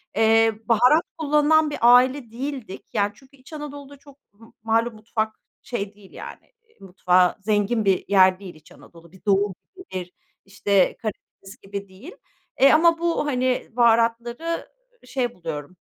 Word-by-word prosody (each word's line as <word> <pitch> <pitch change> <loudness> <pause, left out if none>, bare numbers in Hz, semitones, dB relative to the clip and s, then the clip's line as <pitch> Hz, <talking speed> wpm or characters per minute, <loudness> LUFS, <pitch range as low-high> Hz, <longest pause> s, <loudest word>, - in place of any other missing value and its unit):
eee, 225 0 +4
baharat 250 - +4
kullanılan 300 0 +3
bir 295 - -5
aile 245 0 +4
değildik. 255 -5 -7
Yani 205 -1 +1
çünkü, 275 +1 -21
İç 265 +5 -17
Anadolu'da 285 -2 -9
çok 280 0 -19 0.2
m 225 - -16 0.2
malum 225 +1 0
mutfak 220 0 -3 0.3
şey 205 -4 -5
değil 200 -2 -18
yani, - - -11 0.3
mutfağı 180 -1 +2
zengin 210 +2 0
bir 190 -2 +1
yer 190 -1 +4
değil 185 -5 -10
İç 155 0 -20
Anadolu. 170 -1 -17
Bir 190 - -20
doğu 200 -1 +2 0.2
gibi, 375 0 -13
bir, 180 -1 -6 0.3
işte, 200 0 +1
Karadeniz 210 -1 -9
gibi 200 0 -7
değil. 200 - -13 0.5
Eee, 275 - +7
ama 330 +1 +4
bu, 340 -3 0
hani, 255 -3 -1
baharatları 235 +6 +1 0.4
şey 250 -2 -3
buluyorum, 165 0 -7
225 Hz, 145 wpm, -23 LUFS, 195-275 Hz, 0.5 s, Eee